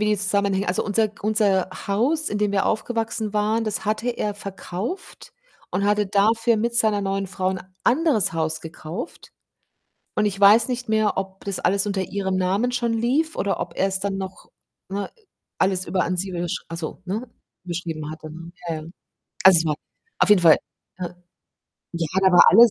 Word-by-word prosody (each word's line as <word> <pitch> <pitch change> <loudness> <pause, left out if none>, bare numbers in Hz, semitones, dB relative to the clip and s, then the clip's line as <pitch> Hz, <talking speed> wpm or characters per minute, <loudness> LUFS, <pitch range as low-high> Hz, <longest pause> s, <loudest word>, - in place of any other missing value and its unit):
wie 210 - +1
die 210 0 +2
zusammenhängen 200 0 +1
also, 180 - 0
unser 215 +1 +2
G 210 - -21
unser 205 -4 +2 0.2
Haus, 265 +11 +2
in 205 - -2
dem 210 -1 +1
wir 195 - +1
aufgewachsen 225 -1 -1
waren, 215 +2 +1
das 215 0 -2
hatte 215 +3 -1
er 210 -3 -3
verkauft 200 - -6 0.4
und 190 +3 -1
hatte 210 0 +2
dafür 225 +4 +3
mit 235 +2 -1
seiner 220 -3 +3
neuen 195 0 -2
Frau 185 0 -1
'n 190 -1 -3 0.2
anderes 275 - +3
Haus 160 -1 -1
gekauft 165 - -8 0.8
und 210 - +2
ich 195 -1 -2
weiß 205 +4 +6
nicht 250 -1 -3
mehr, 215 -1 +2
ob 190 0 -5
das 200 -2 -3
alles 200 +1 +2
unter 200 -2 -1
ihrem 190 0 -2
Namen 190 +6 +1
schon 240 -1 0
lief 260 +8 +1
oder 200 - -1
ob - - -5
er's 190 0 +1
dann 195 -1 -2
noch 190 -1 -7 0.4
ne, 200 +1 -4 0.5
alles 185 -1 +2
über 180 +1 0
an 180 +1 -1
sie 190 +2 -1
überschr 175 -1 -3
ach 165 - -6
so, 165 +2 -6
ne, 220 +7 -3 0.4
überschrieben 165 -3 -4
hatte, 155 0 -9
ne? 170 +2 -10 0.2
Ja, 165 - -1
ja. 155 - -7 0.6
Also, 190 -2 +9
es 165 - +2
war 150 -2 +1 0.4
auf - - +4
jeden 205 -3 +6
Fall, 165 -3 +7 0.4
ne? 180 0 -6 0.7
Ja, 170 -2 -2
da 190 -1 +4
war 175 - +9
alles 230 +3 +8
200 Hz, 190 wpm, -23 LUFS, 185-220 Hz, 0.8 s, Also